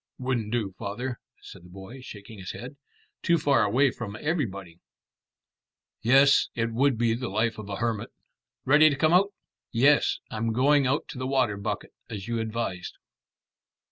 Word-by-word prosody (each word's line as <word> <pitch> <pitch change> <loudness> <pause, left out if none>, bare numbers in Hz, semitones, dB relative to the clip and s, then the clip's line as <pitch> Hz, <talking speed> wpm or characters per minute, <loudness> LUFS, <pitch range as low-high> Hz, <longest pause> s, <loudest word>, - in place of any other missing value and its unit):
"Wouldn't 125 -4 -2
do, 110 -5 -2
father," 115 +4 -4 0.2
said 90 - -12
the 90 - -15
boy, 95 +8 -10
shaking 105 -3 -11
his 95 - -6
head. 125 +4 -8 0.5
"Too 170 - +3
far 145 -5 +3
away 125 +6 +3
from 110 -4 -7
everybody." 100 - -3 1.2
"Yes, 135 +4 +5
it 115 0 -1
would 135 +1 +2
be 115 0 +2
the 120 +1 -3
life 110 +2 0
of 105 -1 -8
a 100 - -3
hermit. 115 -1 -2 0.6
Ready 150 +3 +6
to 145 - -1
come 155 +4 +2
out?" 195 +3 +4 0.4
"Yes, 135 +5 +4
I'm 115 0 -1
going 140 +3 +3
out 140 +4 0
to 130 - -7
the 130 - -2
water 130 -6 +1
bucket, 100 - -4 0.2
as 100 -3 -6
you 115 -1 -1
advised." 110 -5 -4
120 Hz, 165 wpm, -27 LUFS, 105-135 Hz, 1.2 s, Ready